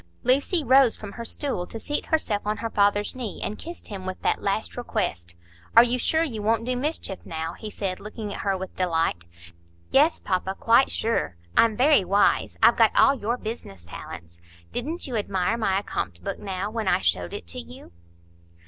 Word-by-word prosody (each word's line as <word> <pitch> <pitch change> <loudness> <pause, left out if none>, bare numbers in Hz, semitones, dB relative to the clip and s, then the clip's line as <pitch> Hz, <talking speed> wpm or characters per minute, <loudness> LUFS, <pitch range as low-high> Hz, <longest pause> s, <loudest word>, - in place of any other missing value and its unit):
Lucy 280 +6 +2
rose 260 -2 +5
from 205 -2 -8
her 235 - -7
stool 230 -7 -2
to 225 - -7
seat 295 +6 -3
herself 225 -10 0
on 210 0 0
her 225 +2 -4
father's 205 +2 +2
knee, 240 -6 -5
and 210 - -4
kissed 340 +1 -8
him 195 -3 -6
with 185 0 -5
that - - +1
last 200 +2 -1
request. 85 - -3 0.4
"Are 230 - +10
you 245 +1 +1
sure 320 +6 +2
you 230 -10 -3
won't 225 +2 +1
do 250 0 0
mischief, 255 - -1
now?" 160 0 -4
he 215 - -8
said, 195 -3 -3
looking 210 -1 -6
at - - -6
her 195 -1 0
with 190 0 -7
delight. 165 - 0 0.7
"Yes, 300 +5 +4
papa, 190 +1 -1
quite 235 +4 +5
sure. 225 - -1 0.2
I'm 225 -2 +4
very 275 -3 +5
wise; 200 +2 +2
I've - - +7
got - - +4
all 275 - +6
your 235 -2 -2
business 215 - -7
talents. 85 0 -10 0.3
Didn't 310 +8 -3
you 255 - -4
admire 200 -1 0
my 205 -5 +1
accompt 90 - -4
book, - - -4
now, 195 +1 -4
when 220 -2 -3
I - - +3
showed 85 +1 0
it 85 0 -6
you?" 80 +1 -9
210 Hz, 190 wpm, -25 LUFS, 185-245 Hz, 0.7 s, Are